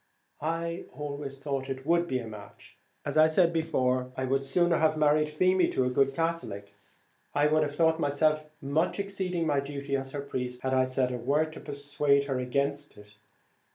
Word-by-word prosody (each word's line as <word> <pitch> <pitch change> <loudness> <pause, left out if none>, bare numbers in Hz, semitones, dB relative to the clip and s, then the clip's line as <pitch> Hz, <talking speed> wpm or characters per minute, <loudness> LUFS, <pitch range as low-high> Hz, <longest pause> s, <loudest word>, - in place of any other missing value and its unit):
I 165 +2 -2
always 140 -2 -5
thought 135 -1 -3
it 135 0 -5
would 170 +2 +2
be 130 - 0
a 120 - -5
match; 105 -2 -12 0.3
and - - -2
though, 155 - +5
as - - +8
I 160 - +4
said 170 +1 +4
before, 130 -6 0
I 130 - -1
would 135 +1 +1
sooner 175 +5 +2
have 155 -1 +2
married 150 0 +3
Feemy 185 +4 +3
to 130 - +2
a 125 - 0
good 135 +1 +2
Catholic, 165 -12 -3 0.6
I 145 +1 +4
should 155 +1 +3
have 145 -1 -1
thought 160 -1 +3
myself 155 +1 +1
much 155 +8 0
exceeding 190 -4 -2
my 145 -3 +2
duty 140 0 -3
as 135 0 -3
her 145 - -3
priest, 125 -3 -4
had 130 0 0
I 130 0 +4
said 130 0 0
a 125 - -2
word 150 +6 0
to - - -9
persuade 145 -1 +1
her 135 -2 -2
against 140 +3 -2
it. 105 0 -16
145 Hz, 200 wpm, -29 LUFS, 135-160 Hz, 0.6 s, as